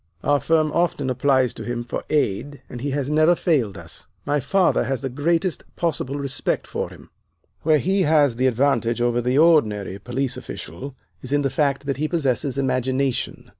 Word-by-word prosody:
Our 145 0 +3
firm 155 -1 +2
often 150 -6 0
applies 130 -1 +2
to - - -8
him 120 -1 -3
for 120 - -5
aid, 145 0 -1
and 120 - -7
he 145 - -2
has 140 -1 -2
never 155 +3 +4
failed 135 - 0
us; - - -10 0.2
my 145 +1 +1
father 190 +8 +2
has 135 -1 -2
the 135 - -3
greatest 165 +7 0
possible 145 -5 -2
respect 140 -2 -2
for - - -4
him. - - -15 0.5
Where 155 0 +4
he 190 +7 +1
has 150 -6 +3
the 130 +1 +2
advantage 120 -2 +1
over 120 0 +1
the 125 +3 0
ordinary 105 - +3
police 125 +4 -3
official 95 - -8 0.3
is 130 - -7
in 145 0 +2
the 135 - 0
fact 140 -1 0
that 140 -2 -2
he 155 +2 0
possesses 140 -4 0
imagination. 130 0 -1
140 Hz, 180 wpm, -22 LUFS, 125-150 Hz, 0.5 s, never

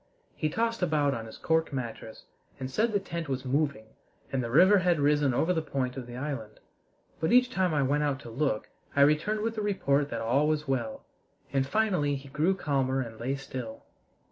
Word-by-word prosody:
He 155 - -1
tossed 230 +5 -1
about 150 -5 +2
on 115 -2 -5
his 110 - -10
cork 160 0 +1
mattress, 120 -4 -6 0.4
and 130 0 -5
said 220 - +1
the 205 - +2
tent 170 -5 -5
was 130 0 -2
moving 140 -3 0 0.5
and 135 -2 0
the 115 - -3
river 185 - +6
had 175 -3 +2
risen 145 -1 +3
over 160 +8 +2
the 160 - 0
point 130 -4 -2
of 130 -3 -6
the 120 0 -8
island; 130 -6 -5 0.6
but 160 - 0
each 250 +1 +5
time 185 -6 +1
I 145 -2 +2
went 145 +3 +1
out 145 -2 0
to 115 - -9
look 130 -3 -1 0.3
I 140 - +4
returned 155 +9 +3
with 225 +1 -1
the 220 - -3
report 145 -9 +1
that - - -3
all 135 +6 +2
was 155 -1 0
well, 120 -5 -2 0.5
and 135 -1 +1
finally 180 -7 +1
he 140 0 -9
grew 155 +7 +1
calmer 135 -6 0
and 115 -3 -7
lay 130 +4 -1
still. 130 -4 -7
145 Hz, 205 wpm, -29 LUFS, 130-170 Hz, 0.6 s, river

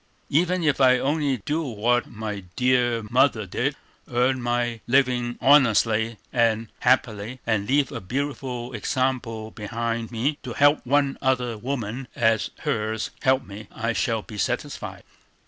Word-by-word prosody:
Even 175 +4 +2
if 145 -3 +2
I 130 -1 +6
only 140 0 0
do 155 +3 0
what 120 -3 0
my 105 -2 -5 0.2
dear 125 -2 +2
mother 125 -4 +3
did, 90 - -1 0.4
earn 125 +2 +2
my 120 -1 -1
living 125 -2 +2
honestly 115 -5 +4 0.2
and 115 -3 +2
happily, 125 -1 +1
and 110 -3 0
leave 140 0 +2
a 115 -5 -5
beautiful 130 +1 -4
example 115 -1 -2
behind 115 +2 -3
me, 135 +6 -1
to 125 -4 -6
help 145 +3 +4
one 140 +1 +2
other 125 -3 +1
woman 120 +1 -4
as 115 -2 +2
hers 110 0 -2
helps 130 -1 +2
me, 100 +1 -10
I 115 +1 -2
shall 115 -2 0
be 105 -2 -9
satisfied." - - -3
120 Hz, 140 wpm, -24 LUFS, 110-135 Hz, 0.4 s, I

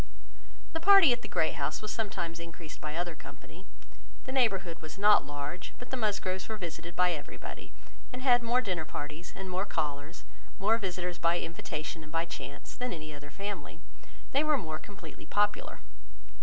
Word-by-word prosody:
The 325 - 0
party 380 -5 +9
at 240 - -2
the - - -5
Great - - +2
House - - -1
was 215 - -4
sometimes 170 -6 -2
increased 165 -1 -8
by 150 0 -3
other 175 0 -1
company. - - -12 0.6
The 260 - -5
neighbourhood 195 -10 +2
was 155 +1 -7
not 205 +1 +6
large, 145 +4 -4
but 245 - -10
the - - +1
Musgroves 205 -5 0
were 220 - -2
visited 170 -2 -5
by 180 0 +5
everybody, 150 -4 -6 0.4
and 250 +1 -5
had 245 -2 +7
more 240 +2 +3
dinner 180 -8 -1
parties, 150 +2 -6
and 190 0 -5
more 185 +1 0
callers, 150 0 -2 0.3
more 220 +3 +4
visitors 180 -3 -2
by 170 +1 +4
invitation 160 0 -4
and 155 0 -11
by 165 0 +1
chance, 145 -4 -7
than 250 -3 -2
any 155 -2 -6
other 145 0 -9
family. 200 +7 -5 0.5
They 280 +2 +4
were 305 -1 +4
more 155 -9 -3
completely 205 +4 -10
popular. 205 0 +1
180 Hz, 175 wpm, -32 LUFS, 160-220 Hz, 0.6 s, party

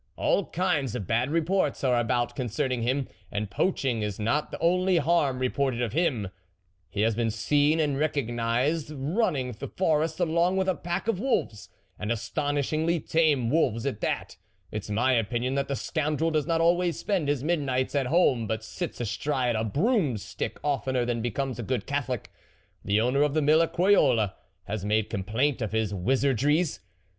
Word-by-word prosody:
All 200 - +1
kinds 150 - 0
of 110 -6 -3
bad 120 +7 +1
reports 165 -1 0
are 125 -2 +3
about 120 +1 0
concerning 130 0 -1
him, 130 +3 0 0.2
and 105 -1 -3
poaching 130 - 0
is 105 -1 -3
not 115 +8 0
the - - -6
only 180 +2 +3
harm 150 -4 +2
reported 130 -1 0
of 120 -3 -1
him; 140 - 0 0.6
he 100 - -2
has 110 +1 +3
,been 115 +1 0
seen 145 +8 +2
and 145 -3 +1
recognised 135 +1 0
running 150 - -1
the 115 - -7
forest 160 -2 0
along 175 +2 +2
with 190 0 +1
a 185 - +3
pack 175 +4 -4
of 225 -5 0
wolves 195 - -1 0.3
and 105 +2 -2
astonishingly 145 +8 0
tame 150 -7 +2
wolves 125 -8 +1
at 130 -7 -3
that. - - -2 0.3
It's 105 0 -5
my 125 +5 +2
opinion 120 +2 0
that 140 0 0
the 140 - -1
scoundrel 155 +2 -1
does 155 -2 0
not 165 -1 +1
always 175 -1 +2
spend 190 -8 -1
his 145 -2 0
midnights 140 -6 0
at 140 -3 +1
home, 130 -8 +3
but 110 0 -2
sits 110 - -5
astride 125 +1 -1
a 110 - 0
broom 150 - +1
stick 100 - -5
oftener 135 -3 0
than 120 -1 -1
becomes 120 +2 -2
a - - -1
good 120 -2 -2
Catholic; 135 -5 -3 0.5
the 100 +2 +2
owner 125 +5 +2
of 150 0 +2
the 155 - +3
mill 155 +3 +5
at 165 - 0
Croyolles 135 - +3 0.4
ha 105 +2 -2
made 105 +1 0
complaint 115 +8 0
of 110 -1 -3
his 110 -2 0
wizardries. 135 - +1
135 Hz, 175 wpm, -27 LUFS, 115-160 Hz, 0.6 s, mill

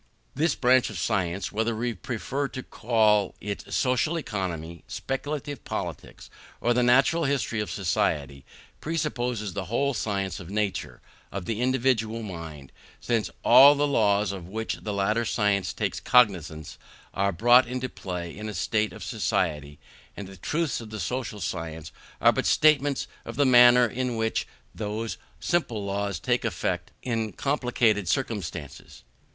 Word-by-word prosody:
This 155 +1 +1
branch 125 -1 +3
of 105 - -7
science, 95 0 -1
whether 110 +2 0
we 120 +2 -2
prefer 130 +7 -3
to 130 -1 -7
call 110 -3 +2
it 100 0 -6
social 130 +6 +1
economy, 85 - -4
speculative 145 0 -4
politics, - - -6 0.3
or 120 - +2
the 125 - +2
natural 135 +7 +4
history 135 -5 0
of 105 - -2
society, 70 -7 -1 0.4
presupposes 125 - -2
the 95 -2 -4
whole 140 +8 0
science 100 -4 -2
of 85 - -9
the 100 - -7
nature 105 -2 -2 0.3
of 95 -2 -5
the 110 +4 -2
individual 120 -3 +1
mind; 80 -8 -8 0.3
since 115 -3 0
all 135 +4 +8
the 145 +1 +2
laws 105 -7 +2
of 95 -4 -7
which 110 +4 -3
the 105 - -4
latter 105 +3 +1
science 105 -4 +1
takes - - -2
cognizance 85 -10 +2 0.3
are 100 0 +1
brought 120 +7 +5
into 130 +1 -3
play 90 -7 -6
in 110 +1 -6
a 105 - -6
state 110 -1 0
of - - -9
society, 80 - -1 0.4
and 100 - -6
the 95 - -11
truths 150 - -2
of 110 - -9
the 110 0 -6
social 115 +2 -3
science 80 -3 -5 0.3
are - - +6
but - - -1
statements 145 -3 +3 0.2
of - - -8
the 145 - +3
manner 125 -1 +7
in 125 +1 -2
which 110 0 -1 0.3
those 110 +1 -4 0.2
simple 120 - -1
laws 100 -2 -2
take - - 0
effect - - -2
in 115 -4 -1
complicated 120 - +1
circumstances. 95 - -4
110 Hz, 150 wpm, -26 LUFS, 100-125 Hz, 0.4 s, all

